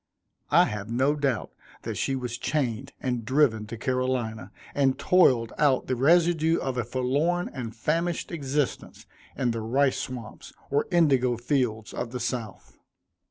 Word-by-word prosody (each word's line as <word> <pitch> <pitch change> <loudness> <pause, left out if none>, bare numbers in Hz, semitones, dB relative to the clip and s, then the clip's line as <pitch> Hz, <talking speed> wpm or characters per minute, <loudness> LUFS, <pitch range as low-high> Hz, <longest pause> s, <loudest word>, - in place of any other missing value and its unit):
I - - +6
have 105 0 -5
no 130 +5 +2
doubt 140 -6 -1 0.3
that - - -3
she 135 - -1
was 125 -2 -4
chained 125 -7 -2
and 125 -3 -2
driven 115 -4 +2
to 115 +1 -7
Carolina, 125 -5 -2 0.2
and 135 -2 +2
toiled 130 -11 +3
out 140 -3 +3
the 130 - -1
residue 165 +3 +3
of 130 -1 -2
a - - 0
forlorn 135 +9 0
and 120 -4 -6
famished 165 +8 -1
existence 145 -3 -3 0.3
in 125 -3 +1
the 115 -1 -3
rice 130 +5 +1
swamps, 125 -3 -7 0.2
or 145 +1 +1
indigo 135 -9 +3
fields 120 -4 -1
of 120 0 -4
the 125 - -3
South. 120 -3 -5
130 Hz, 150 wpm, -26 LUFS, 115-145 Hz, 0.3 s, I